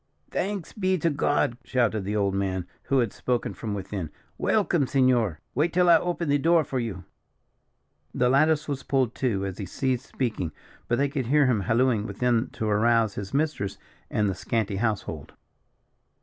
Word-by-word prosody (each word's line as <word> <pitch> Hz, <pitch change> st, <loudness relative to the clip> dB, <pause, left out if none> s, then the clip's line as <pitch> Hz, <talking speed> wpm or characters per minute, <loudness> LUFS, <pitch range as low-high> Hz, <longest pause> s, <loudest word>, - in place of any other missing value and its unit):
"Thanks 195 Hz, -3 st, -3 dB
be 185 Hz, -2 st, +1 dB
to 165 Hz, 0 st, +1 dB
God!" 140 Hz, -3 st, +1 dB
shouted 110 Hz, -6 st, 0 dB
the 105 Hz, +2 st, -2 dB
old 100 Hz, -2 st, +1 dB
man, 95 Hz, -2 st, -1 dB, 0.2 s
who 135 Hz, -, +1 dB
had 120 Hz, -5 st, +1 dB
spoken 125 Hz, -1 st, -1 dB
from 105 Hz, -3 st, -4 dB
within; 95 Hz, -4 st, -4 dB, 0.3 s
"welcome, 175 Hz, -9 st, +1 dB
senor. 125 Hz, -, +2 dB
Wait 155 Hz, +6 st, +1 dB
till 180 Hz, 0 st, +3 dB
I 165 Hz, -, +8 dB
open 175 Hz, -1 st, -2 dB
the 145 Hz, 0 st, +3 dB
door 165 Hz, +2 st, +4 dB
for 130 Hz, -2 st, -3 dB
you." 105 Hz, -6 st, -4 dB, 1.1 s
The 125 Hz, -, +1 dB
lattice 150 Hz, +4 st, +3 dB
was 140 Hz, -2 st, -3 dB
pulled 130 Hz, -5 st, 0 dB
to, 105 Hz, -7 st, +1 dB
as 95 Hz, -1 st, -5 dB
he 100 Hz, -, -4 dB
ceased 130 Hz, +5 st, -2 dB
speaking; 110 Hz, -, -2 dB, 0.3 s
but 120 Hz, -, +1 dB
they 140 Hz, -, +2 dB
could 135 Hz, -3 st, -3 dB
hear 145 Hz, +2 st, +4 dB
him 125 Hz, -5 st, +2 dB
hallooing 115 Hz, +1 st, +2 dB
within 120 Hz, -1 st, +1 dB
to 110 Hz, -, -3 dB
arouse 110 Hz, 0 st, +3 dB
his 95 Hz, -1 st, -6 dB
mistress 145 Hz, -9 st, -1 dB, 0.3 s
and 105 Hz, -1 st, +1 dB
the 95 Hz, -, 0 dB
scanty 100 Hz, +1 st, -2 dB
household. 100 Hz, -9 st, -2 dB
120 Hz, 175 wpm, -26 LUFS, 105-145 Hz, 1.1 s, I